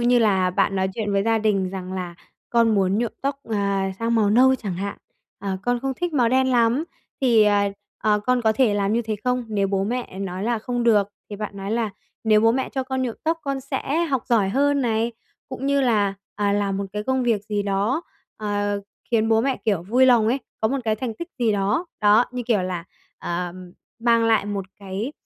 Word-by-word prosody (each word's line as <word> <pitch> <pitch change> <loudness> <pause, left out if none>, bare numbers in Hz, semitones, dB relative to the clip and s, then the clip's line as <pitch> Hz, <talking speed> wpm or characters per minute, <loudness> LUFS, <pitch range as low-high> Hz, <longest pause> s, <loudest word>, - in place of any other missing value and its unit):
như 240 +1 +4
là 190 -5 +3
bạn 195 +1 +1
nói 190 0 +1
chuyện 210 -3 -2
với 195 0 +2
gia 225 0 +2
đình 200 -4 +1
rằng 185 -1 -6
là 180 -2 -4 0.4
con 230 -2 +3
muốn 195 +1 +2
nhuộm 235 -2 -1
tóc, 275 0 -1
à, 200 -2 0
sang 230 0 0
màu 210 -3 +3
nâu 260 +4 +5
chẳng 200 -8 -4
hạn, 200 +2 -4 0.4
à, 195 -1 -3
con 245 0 0
không 270 0 -1
thích 350 +4 -3
màu 245 -5 +3
đen 260 +1 +3
lắm 245 +4 +3 0.4
thì, 235 -5 +5
à, 205 -1 +3 0.3
à, 210 -1 +2
con 250 -1 +2
có 220 -1 +3
thể 220 -3 +2
làm 200 0 +1
như 235 +1 +1
thế 215 -1 -3
không? 250 0 0
Nếu 200 -2 +1
bố 195 0 0
mẹ 240 -4 -4
nói 190 -1 -4
là: 235 0 0
"Không 245 +2 -2
được." 210 -4 +4 0.2
Thì 205 - -5
bạn 210 -1 -5
nói 195 +1 -5
là 225 -1 0 0.3
nếu 215 -1 +5
bố 225 +1 +4
mẹ 260 +1 -1
cho 265 - -2
con 260 0 -2
nhuộm 240 -3 -2
tóc 325 +1 +1
con 275 -1 -2
sẽ 280 +4 -1
học 270 -6 -1
giỏi 215 -5 +3
hơn 280 +5 +2
này, 230 -1 0 0.4
cũng 260 +1 -5
như 280 0 +3
là, 210 -6 +2 0.2
à, 205 -1 +1
làm 200 -1 0
một 200 - -2
cái 210 0 -3
công 260 +2 0
việc 225 -4 +1
gì 210 -1 -1
đó, 205 - 0 0.3
ờ, 205 -1 -1 0.3
khiến 225 -1 +2
bố 225 0 +4
mẹ, 265 +1 0
kiểu, 200 -7 +1
vui 245 +8 +3
lòng 235 -4 +5
ấy, 255 - +1 0.2
có 220 - +2
một 275 - -1
cái 220 -1 +1
thành 230 0 -4
tích 340 +7 -7
gì 230 -3 +2
đó. 205 - 0
Đó, 210 +3 +5
như 250 -1 -3
kiểu 210 -6 +2
là, 180 -2 -3 0.3
ờ, 175 0 -3 0.5
mang 230 -1 +3
lại 220 -3 +3
một 205 -1 -3
cái, 200 +7 -4
220 Hz, 230 wpm, -23 LUFS, 200-245 Hz, 0.5 s, nâu